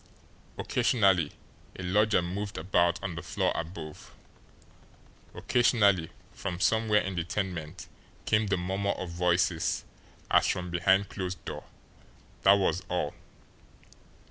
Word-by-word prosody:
Occasionally 95 - +2 0.5
a 95 - -6
lodger 105 +1 +3
moved 100 +3 -4
about 85 0 +2
on 90 - -3
the 85 - -6
floor - - -1
above; 80 -2 -7 1.2
occasionally 100 -8 +3 0.2
from 90 -3 -5
somewhere 110 0 +3
in 95 - -4
the 85 -2 -1
tenement 85 -3 -4 0.4
came 105 0 +2
the 100 -1 +1
murmur 95 +3 -1
of 90 -2 -6
voices 85 -1 +1 0.5
as - - +5
from 90 -1 -2
behind 95 +3 +3
closed 90 -4 -5
door - - -6 0.8
that 95 - +7
was 95 -3 +1
all. 90 -5 -1
90 Hz, 115 wpm, -29 LUFS, 85-100 Hz, 1.2 s, that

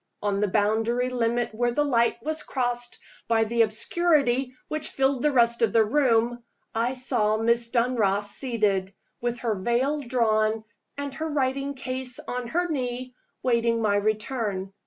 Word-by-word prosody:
On 200 -1 0
the 210 - +2
boundary 225 +5 +1
limit 240 -1 0
where 240 +2 0
the 295 +5 +1
light 235 -4 +2
was 310 +1 -2
crossed 245 -3 -2 0.3
by 225 -1 +3
the 230 +1 +1
obscurity 260 +2 +2
which 310 -1 -1
filled 270 -1 +1
the 300 - +3
rest 235 -3 +3
of 225 -4 +2
the 225 - +5
room, 240 -1 +2 0.3
I 235 +3 0
saw 215 -4 +1
Miss 235 +1 +2
Dunross 225 -5 +1
seated, 205 -7 0 0.3
with 240 0 -2
her 230 -3 0
veil 240 +9 0
drawn 220 -4 +1 0.3
and 285 -1 -4
her 320 +2 -4
writing 275 0 -1
case 255 -1 -3
on 245 -1 -3
her 350 +8 0
knee, 255 -4 -3 0.3
waiting 235 -2 +2
my 210 -2 +2
return. 210 -2 -1
240 Hz, 155 wpm, -26 LUFS, 220-260 Hz, 0.3 s, the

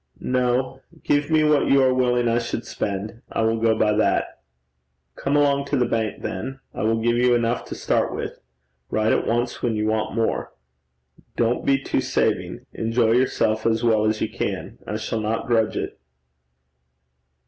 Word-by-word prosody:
'No. 130 +1 0 0.2
Give 145 0 +1
me 155 -1 +4
what 150 -2 +3
you 135 -1 +5
are 130 -1 +4
willing 125 -1 +2
I 115 +1 +2
should 120 -1 -4
spend: 105 +3 -4
I 115 - 0
will 115 0 +1
go 110 -1 +2
by 105 -1 +3
that.' - - 0 0.7
'Come 140 +1 -1
along 140 -1 +2
to 140 0 -1
the 125 - +2
bank 115 -2 -2
then. 135 +9 -4
I - - -5
will 115 +1 +1
give 120 +1 +1
you 125 0 +4
enough 120 0 0
to - - -7
start - - 0
with. - - -5 0.5
Write 110 0 +2
at - - 0
once 120 +1 -1
when 115 -2 0
you 105 0 -1
want 110 0 -1
more. 115 -1 -1 0.8
Don't 120 +1 0
be 135 0 +5
too - - -1
saving. - - -1
Enjoy 115 0 +1
yourself 115 -3 +1
as 115 +1 +1
well 110 -2 +3
as 110 0 0
you - - 0
can. - - -4
I 105 - -2
shall 110 0 -3
not 110 +1 -2
grudge 115 -4 +1
it.' - - -4
115 Hz, 180 wpm, -23 LUFS, 110-130 Hz, 0.8 s, you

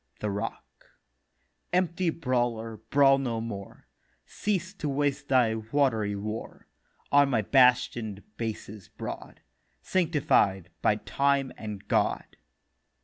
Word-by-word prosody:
THE 105 - -2
ROCK: 100 +1 -7 0.7
'Empty 180 0 +1
Brawler, 120 -7 -1
brawl 135 -1 +5
no 120 -4 -2
more; 105 -4 -7 0.4
Cease 190 -2 -2
to 155 -7 -4
waste 145 0 -1
thy 125 -4 +3
watery 110 -2 0
war 105 +3 -6 0.4
On 145 -1 +5
my 115 -5 +1
bastion'd 120 -4 +3
Bases 110 -4 -6
broad, - - -8 0.4
Sanctified 135 - +1
by 105 - +3
Time 140 +4 0
and 105 -2 -7
God. - - 0
125 Hz, 105 wpm, -28 LUFS, 110-140 Hz, 0.7 s, brawl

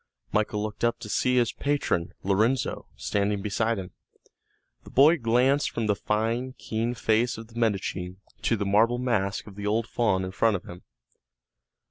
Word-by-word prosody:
Michael 105 0 0
looked 105 +1 -5
up 120 0 +2
to 105 - -7
see 125 +4 +1
his 120 -2 +3
patron, 140 -12 -1
Lorenzo, 110 +7 +1
standing 100 0 -1
beside 110 +2 0
him. 95 -2 -6 0.9
The - - -13
boy 150 +5 +5
glanced 125 +4 +2
from 115 - -2
the 105 - +3
fine, 115 +5 -1
keen 115 +2 -2
face 115 +2 +1
of 115 0 -10
the 115 0 -7
Medici 95 -5 -1 0.3
to 115 - +1
the 100 - -2
marble 110 +5 +3
mask 115 -6 -1
of 105 - -11
the 100 +1 -5
old 110 +2 +1
faun 105 -5 0
in 95 - -5
front 110 +2 +2
of 90 - -4
him. 90 0 -10
110 Hz, 170 wpm, -26 LUFS, 100-120 Hz, 0.9 s, boy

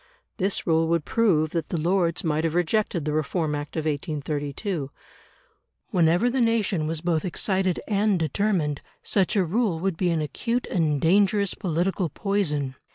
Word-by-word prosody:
This 195 -1 0
rule 160 -1 +2
would 170 -2 0
prove 165 -9 +2
that 165 -3 -2
the 170 - -1
Lords 170 0 +1
might 155 -1 0
have 165 0 -1
rejected 175 -2 0
the 150 - -1
Reform 155 +1 -1
Act 145 0 -5
of 160 -1 -2
1832. 150 +1 -3 1.0
Whenever 175 +6 +3
the 250 +1 +1
nation 210 -8 +1
was 160 -1 -3
both 165 -2 0
excited 190 0 0
and 210 -1 +2
determined, 165 -2 0 0.2
such 195 -1 +1
a 195 -3 +3
rule 195 -1 0
would 185 -1 -1
be 180 0 +1
an 165 -2 +1
acute 235 - -2
and 155 -5 +1
dangerous 200 +4 +3
political 180 +1 -1
poison. 150 -8 -1
170 Hz, 160 wpm, -25 LUFS, 155-195 Hz, 1.0 s, Whenever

